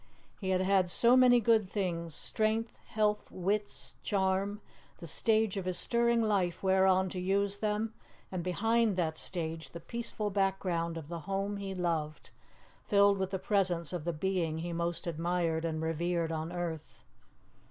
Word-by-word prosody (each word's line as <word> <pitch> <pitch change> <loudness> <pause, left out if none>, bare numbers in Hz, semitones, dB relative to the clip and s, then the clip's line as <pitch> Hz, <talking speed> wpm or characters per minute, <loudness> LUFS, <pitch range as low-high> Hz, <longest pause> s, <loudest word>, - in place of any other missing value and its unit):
He 190 - -3
had 185 -1 +2
had 190 -1 +3
so 235 +7 +5
many 250 -1 +7
good 220 -3 +3
things 170 -6 -2
strength, 220 +1 0
health, 210 -1 0
wits, 200 +3 -2
charm; 195 +1 0 0.4
the - - -9
stage 215 +5 +1
of 190 - -3
his 185 -1 -1
stirring 235 -1 +2
life 195 -5 0
whereon 190 0 +4
to 180 - -5
use 200 +2 0
them, 215 +1 -1 0.4
and 180 -2 -3
behind 225 +4 +2
that 165 -3 0
stage 165 -2 -4
the 170 - -8
peaceful 215 +1 -4
background 185 -4 0
of 160 -3 -7
the 170 +1 -5
home 195 +1 -1
he 195 -1 -5
loved, 165 -4 -2 0.5
filled 200 -1 +4
with 190 -1 -1
the 190 - -2
presence 185 -4 0
of 175 -4 -3
the 170 - -1
being 170 -1 -1
he 170 +1 -4
most 170 +2 -2
admired 165 0 -1
and 160 -1 -2
revered 165 +1 -1
on 160 +1 -3
earth. 170 -3 -5
190 Hz, 160 wpm, -31 LUFS, 170-205 Hz, 0.5 s, many